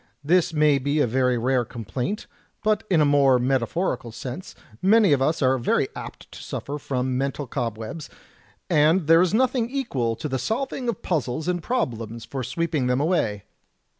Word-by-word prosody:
This 175 +3 +3
may 150 -3 +3
be 140 +3 0
a 145 - +4
very 125 +1 +1
rare 125 +1 +1
complaint, 120 - -4 0.4
but 215 0 +2
in 170 -5 +4
a - - +5
more 140 -2 +4
metaphori 130 - 0
cal 120 - -9
sense, 130 +9 -7 0.3
many 205 -3 +5
of 135 - +1
us 155 +2 +1
are 130 0 +3
very 120 - +1
apt - - -9
to - - -10
suffer 145 +1 -5
from 130 -2 -2
mental 140 +1 -2
cob 120 -3 -3
webs, 115 +8 -7 0.6
and 155 +4 +3
there 165 +2 +6
is 180 - +2
nothing 245 +1 +1
equal 140 - -1
to 115 - -5
the 130 -2 -2
solving 245 - -2
of 225 - -4
puzzles 155 -2 -2
and 180 -1 0
problems 115 - -3
for 135 +2 -5
sweeping 150 +1 -1
them 125 +1 +1
away. 140 - 0
140 Hz, 180 wpm, -24 LUFS, 125-175 Hz, 0.6 s, there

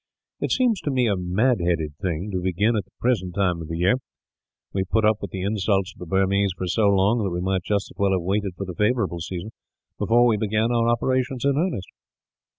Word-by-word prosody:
It - - -2
seems 240 -6 +2
to - - -2
me 130 -3 +2
a 105 -3 +2
mad 95 +7 +1
headed 85 -4 0
thing, 90 +2 -2
to 90 -2 -2
begin 100 +6 +1
at 105 -4 -1
the - - -33
present 95 -8 0
time 90 -4 +1
of 80 - -7
the 85 0 -4
year. 95 +8 +3 0.8
We 95 - 0
have 95 - -4
put 110 -1 +2
up 110 -1 +4
with 100 - -4
the 95 -1 -5
insults 100 -1 0
of - - -22
the 90 - -8
Burmese 95 +1 +2
for 95 - -3
so 105 +4 +2
long 100 +4 +3
that 100 - 0
we 90 0 -3
might 95 +1 0
just 100 +2 -2
as - - -17
well 100 -1 +3
have 95 - +1
waited 100 0 -1
for 100 - -4
the 90 - -6
favourable 105 -3 0
season, 90 +5 -5 0.5
before 120 +2 +4
we 115 -3 +3
began 110 +2 0
our 115 -1 +2
operations 130 +2 0
in 140 -1 +3
earnest." 155 - -1
100 Hz, 235 wpm, -24 LUFS, 90-115 Hz, 0.8 s, up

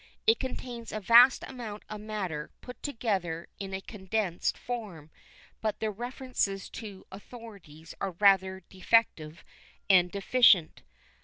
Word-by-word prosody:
It 450 - +4
contains 245 -3 -6
a 215 - -3
vast 235 +6 +6
amount 225 -5 -8
of 210 -1 -7
matter 190 -8 -4
put 250 -2 -11
together 195 - -2
in 195 -1 -6
a 190 0 -4
condensed 195 -3 -2
form 200 -11 -7 0.5
but 215 -1 -2
the 220 -1 -1
references 240 -3 -3
to 205 -5 -9
authorities 195 -7 -12
are 195 - -1
rather 190 0 +3
defective 185 -5 0 0.5
and 180 -2 +5
deficient. 200 -4 +4
205 Hz, 125 wpm, -29 LUFS, 190-230 Hz, 0.5 s, vast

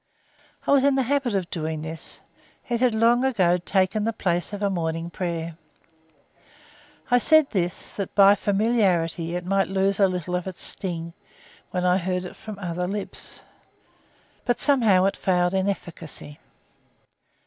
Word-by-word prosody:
I - - +1
was 280 -1 +5
in 280 -1 +4
the 265 - +2
habit 265 -3 0
of 185 -2 -2
doing 155 -2 -3
this; 160 +1 -7 0.5
it 240 -2 -1
had 250 -2 +2
long 235 +3 +4
ago 190 -10 +3
taken 190 +3 0
the 225 - +1
place 175 -5 -1
of 205 0 -5
a 200 - +2
morning 165 -1 -2
prayer. 170 -2 -4 1.5
I 245 - +6
said 315 +2 +4
this, 175 -4 -2
that 200 -2 -4
by 200 0 +8
familiarity 195 -6 +1
it 180 0 -4
might 195 +1 +1
lose 195 +1 0
a 195 - +6
little 180 -1 -4
of 180 +1 -3
its 185 - -6
sting 170 -3 -4 0.6
when 180 -1 -2
I 180 0 +4
heard 180 0 -2
it - - -9
from 215 -2 -9
other 180 -2 -3
lips, 200 +1 -6 1.0
but 245 - +1
somehow 225 -10 +4
it 195 - +1
failed 180 -1 +1
in 190 +1 +1
efficacy. 165 -5 -6
190 Hz, 160 wpm, -24 LUFS, 175-215 Hz, 1.5 s, by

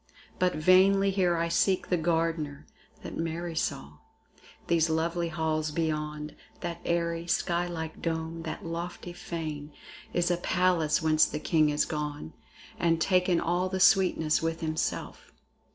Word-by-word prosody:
But 180 0 +2
vainly 195 +4 +5
here 180 -3 +2
I 165 0 0
seek 185 +2 +1
the 180 - +3
Gardener 160 -3 -1 0.4
That - - -7
Mary 165 +1 -3
saw. 75 - -3 0.7
These 165 -1 +2
lovely 165 +2 0
halls 155 -1 -1
beyond, 150 -1 -3 0.3
That 170 -1 -5
airy, 170 0 -1
sky 175 0 0
like 160 -2 -6
dome, 165 0 -3
that 165 0 -6
lofty 170 +1 -5
fane, 155 -4 -6 0.4
Is 175 0 +1
as 175 - 0
a - - -18
palace 175 -5 +2
whence 155 -1 +4
the - - -4
king 155 -1 +2
is 150 0 +1
gone 150 - -4 0.5
And 165 -1 +2
taken 180 0 +2
all 175 +2 0
the 190 0 -2
sweetness 185 -6 +4
with 165 0 -2
himself. 160 -1 -3
165 Hz, 145 wpm, -28 LUFS, 155-175 Hz, 0.7 s, vainly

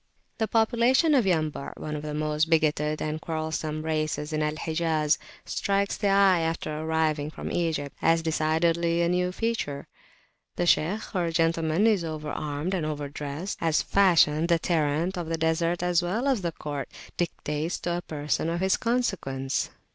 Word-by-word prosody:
The 220 - +1
population 235 - +3
of 255 -6 +4
Yambu' 155 -5 -1
one 150 0 -5
of 150 - -4
the 150 0 -5
most 155 +1 0
bigoted 155 -1 +1
and 155 +1 -3
quarrelsome 155 -1 -3
races 155 -1 -2
in 155 - 0
Al 150 0 0
Hijaz 155 -1 0 0.3
strikes 200 0 0
the 205 - -1
eye 195 -2 +5
after 165 -2 -2
arriving 155 -1 0
from - - -6
Egypt, 155 -5 -1
as 165 0 +3
decidedly 165 +2 +1
a 170 - +2
new 180 0 +1
feature. 185 -10 -2 0.7
The 175 - 0
Shaykh 180 +5 +1
or 175 -3 0
gentleman 165 +2 +1
is 210 -6 +3
over 155 -2 -4
armed 150 +5 -3
and 180 -4 -1
over 150 -2 -3
dressed, 145 +6 -5
as 165 -2 +2
Fashion, 170 -5 +4
the 170 -1 +4
Tyrant 165 +2 0
of 170 - -4
the 165 0 -1
Desert 165 +2 0
as 180 -1 +2
well 210 +10 -1
as 265 -5 +2
of - - -9
the 170 -2 -1
Court, 145 -4 -5 0.3
dictates 160 -1 -2
to 175 0 -1
a - - -3
person 150 0 -2
of 170 +1 -1
his 190 +1 +2
consequence. 175 - -1
160 Hz, 170 wpm, -27 LUFS, 155-180 Hz, 0.7 s, eye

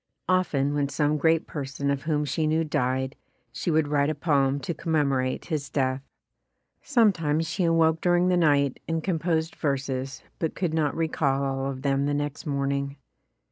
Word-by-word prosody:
Often 155 -7 +1
when 145 -1 0
some 150 +1 +1
great 160 +2 +3
person 140 -1 -3
of 140 -1 -1
whom 150 -2 +1
she 155 +3 0
knew 160 +1 +2
died, 130 -3 -1 0.4
she - - -3
would 155 -2 +2
write 145 0 +2
a 155 - -1
poem 140 -3 +1
to 170 - -3
com 160 +1 -4
memorate 135 -4 +1
his 150 -3 -2
death. 130 -1 0 0.8
Sometimes 165 - +2
she 175 +2 -1
awoke 165 -1 +3
dur 175 -1 +3
ing 175 +1 +3
the 180 - +3
night 145 -5 +2
and 165 -1 -1
composed 165 -2 -1
verses 135 -2 -2 0.2
but 160 - -2
could 175 -4 -1
not 155 -3 +1
recall 140 -4 0
all 135 0 -1
of 130 -1 -6
them 140 0 +1
the 145 - 0
next 145 +1 -3
morning. 140 0 -1
145 Hz, 180 wpm, -26 LUFS, 140-160 Hz, 0.8 s, great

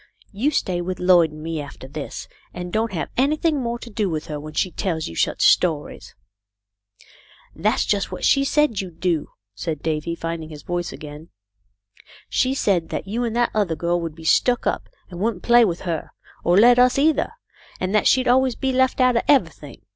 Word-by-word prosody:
You 225 +9 0
stay 185 -11 -1
with 180 +1 -4
Lloyd 180 -3 +4
and 155 0 -10
me, 165 -1 -3
after 140 -2 -10
this, 140 +1 -7 0.3
and 180 0 -6
don't 220 0 0
have 170 -4 -4
anything 300 +2 +1
more 235 -1 -2
to 235 - -10
do 210 -2 -1
with 155 -2 -3
her 150 -1 -5
when 155 +1 -9
she 185 - 0
tells 165 -4 -2
you 85 - -8
such - - +1
stories." 160 -5 +1 1.4
"That's - - +1
just 200 -1 0
what - - -4
she 275 - +4
said 290 -6 +1
you'd 180 -4 -10
do," 170 -4 0 0.3
said 155 +7 -5
Davy, 160 +1 -2
finding 165 -1 -5
his 150 -2 -10
voice 175 -1 -3
again. 150 +2 -10 0.5
" 100 0 -25
She 260 +1 +1
said 185 -10 +1
that - - -4
you 230 +5 -2
and 230 -1 -2
that 240 0 +2
other 200 -6 0
girl 175 +2 -1
would 165 -2 -5
be 165 - -12
stuck 245 +9 +3
up - - -2 0.2
and 175 - -8
wouldn't 210 -2 -2
play 240 0 +6
with 175 -4 -2
her, 170 -4 -3 0.3
or 175 +2 +3
let 240 +3 +6
us 250 +1 +4
either, 305 +8 +2 0.5
and 185 +2 -2
that 215 - +3
she'd 255 -1 +3
always 255 0 +3
be 265 -1 -1
left 260 +1 +2
out 255 -1 +4
of - - +3
everything. 285 -2 0
185 Hz, 200 wpm, -22 LUFS, 160-240 Hz, 1.4 s, play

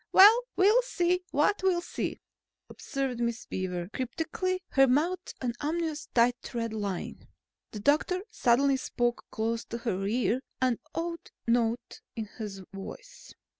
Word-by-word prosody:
"Well, 425 +5 +9
we'll 415 +6 +5
see 360 -7 +1
what 330 +8 +2
we'll 375 -2 +3
see," - - -4 0.5
observed 270 -4 -3
Miss 235 0 -1
Beaver 180 -2 -3
cryptically, 325 +8 -2
her 270 0 +5
mouth 335 +8 +1
an 245 -2 -1
ominous 315 0 -2
tight 245 +1 +2
red 230 -1 -1
line. 200 -4 -4 0.4
The 210 - -7
doctor 315 - +2
suddenly 270 - +3
spoke 240 -2 -1
close 230 +1 -1
to 235 - -5
her 195 -5 -2
ear, 245 +3 +1 0.2
an 255 -3 +2 0.2
odd 335 0 -4 0.2
note 235 0 0
in 225 - -3
his 200 -3 -5
voice. - - -10
255 Hz, 135 wpm, -29 LUFS, 230-345 Hz, 0.5 s, Well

